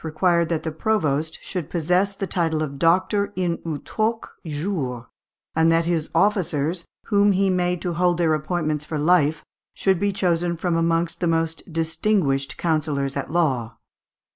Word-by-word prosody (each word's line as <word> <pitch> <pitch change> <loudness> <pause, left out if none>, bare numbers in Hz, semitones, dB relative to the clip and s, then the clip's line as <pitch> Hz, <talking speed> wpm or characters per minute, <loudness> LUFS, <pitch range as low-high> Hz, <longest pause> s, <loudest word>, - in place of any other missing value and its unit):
required 170 +1 +1
that 165 -2 -1
the 160 - -3
provost 160 -4 0
should 180 -6 -4
possess 180 +4 +1
the 195 - -3
title 165 -4 0
of 140 -2 -6
doctor 190 +5 +2
in 175 -2 -1
utroque 215 +8 -2
jure, 145 - -3 0.5
and 160 +1 +4
that 165 0 +3
his 165 -2 -1
officers, 170 -3 +1 0.2
whom 205 -1 +4
he 195 0 +2
made 180 -1 0
to 175 0 -3
hold 175 0 +2
their 165 -2 +2
appointments 155 -1 -1
for 155 +1 -4
life, 155 -1 +2 0.3
should 190 -3 +1
be 205 +1 +1
chosen 175 -3 0
from 175 0 -1
amongst 165 0 0
the 175 - 0
most 165 +1 -1
distinguished 160 -4 0
counsellors 145 -4 -1
at 140 - -3
law. 130 -10 0
165 Hz, 155 wpm, -23 LUFS, 155-180 Hz, 0.5 s, and